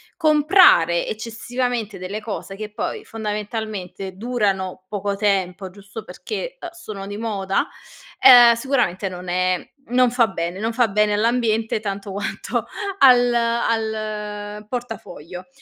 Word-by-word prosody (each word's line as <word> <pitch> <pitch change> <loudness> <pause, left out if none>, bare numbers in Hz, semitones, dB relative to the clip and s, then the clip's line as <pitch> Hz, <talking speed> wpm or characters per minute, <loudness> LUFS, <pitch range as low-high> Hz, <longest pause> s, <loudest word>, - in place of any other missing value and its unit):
comprare 305 - +5
eccessivamente 230 -1 -3
delle 190 +4 -5
cose 210 -2 -6
che 210 +1 -7
poi, 210 - -4
fondamentalmente, 210 -3 -5
durano 195 -5 -2
poco 205 -1 -2
tempo, 195 -2 -1
giusto 200 +3 -10
perché, 475 - -6
uhm, 350 - -6
sono 215 -13 -8
di 205 0 -6
moda, 200 -4 -1 0.5
ehm, 245 -2 +9
sicuramente 230 -6 0
non 180 0 -8
è 185 0 0 0.2
non 250 0 +3
fa 240 -2 +3
bene, 175 -3 -4
non 225 +2 -1
fa 240 0 +3
bene 210 +1 +2
all'ambiente 225 0 +1
tanto 200 -1 -5
quanto 200 +2 -3 0.3
al 245 -2 +6
al 215 -3 -2
portafoglio. 210 - -7
215 Hz, 125 wpm, -21 LUFS, 195-235 Hz, 0.5 s, ehm